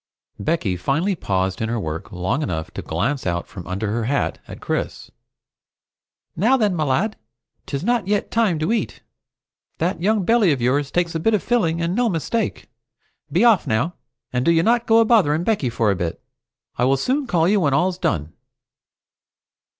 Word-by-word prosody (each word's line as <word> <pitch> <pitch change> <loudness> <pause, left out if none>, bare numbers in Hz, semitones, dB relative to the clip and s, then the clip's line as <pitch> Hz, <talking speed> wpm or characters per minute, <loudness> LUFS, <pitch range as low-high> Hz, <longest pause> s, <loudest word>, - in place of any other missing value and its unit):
Becky 125 - -1
finally 160 - 0
paused 95 - -1
in 110 - -1
her 120 0 -1
work 80 -4 -5
long 90 - -1
enough 80 - -3
to - - -6
glance 125 - -2
out 85 0 -1
from 95 -9 -10
under 100 +3 -2
her 115 0 -1
hat 140 +4 -1
at - - -9
Chris. - - -4 1.2
"Now 235 +9 +3
then, 210 -6 +1
me 155 - 0
lad! 180 +11 0 0.5
'Tis 140 +2 -3
not 235 -2 +1
yet 205 0 0
time 220 -7 +2
to 155 +8 0
eat. 235 - -3 0.7
That 170 +1 -1
young 205 0 +1
belly 225 -5 +4
of 140 - 0
yours 135 +4 +1
takes 175 0 0
a 165 - -1
bit 220 +7 +2
of 200 - -2
filling, 175 -9 +1
and 170 +1 0
no 240 +2 +2
mistake! 200 +5 -2 0.6
Be 180 +10 +3
off 220 -10 +4
now, 120 +9 0 0.4
and 125 0 0
do - - +2
you 165 0 +4
not 235 +3 +2
go 225 0 +6
a - - +4
bothering 175 -9 +3
Becky 195 - 0
for 115 -2 +1
a - - 0
bit. 85 -2 -3 0.6
I 125 - +3
will 135 +1 +3
soon 265 - 0
call 165 -4 +2
you 205 +2 +3
when 140 -6 +2
all's 180 +4 +1
done." 80 - -1
160 Hz, 190 wpm, -21 LUFS, -, 1.2 s, go